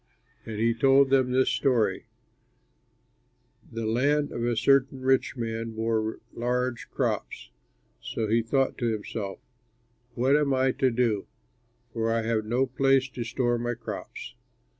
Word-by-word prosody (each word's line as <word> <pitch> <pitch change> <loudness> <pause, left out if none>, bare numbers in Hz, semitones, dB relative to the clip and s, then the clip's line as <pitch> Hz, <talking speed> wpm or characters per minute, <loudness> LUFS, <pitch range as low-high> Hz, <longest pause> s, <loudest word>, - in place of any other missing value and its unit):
And 110 -1 -5
he 115 +1 +3
told 135 +3 +4
them 130 -2 +3
this 130 +1 +3
story: 125 -6 +1 1.6
"The 115 0 -4
land 145 +6 +1
of 120 - -4
a 120 0 +1
certain 135 +2 +3
rich 130 0 +1
man 115 -1 -3
bore 110 0 -1
large 125 0 -2
crops; - - -3 0.5
so 110 - -3
he 115 +2 +3
thought 135 +4 0
to 120 - 0
himself, 105 -2 -4 0.8
'What 130 +4 +3
am 145 -2 +2
I 130 0 +2
to 130 +1 +1
do, 115 -4 0 0.7
for 115 -1 0
I 115 0 0
have 110 -1 0
no 120 +4 +1
place 135 +1 +2
to 125 -1 -5
store 120 0 0
my 120 0 -2
crops.' 115 -1 -7
120 Hz, 140 wpm, -27 LUFS, 115-130 Hz, 1.6 s, told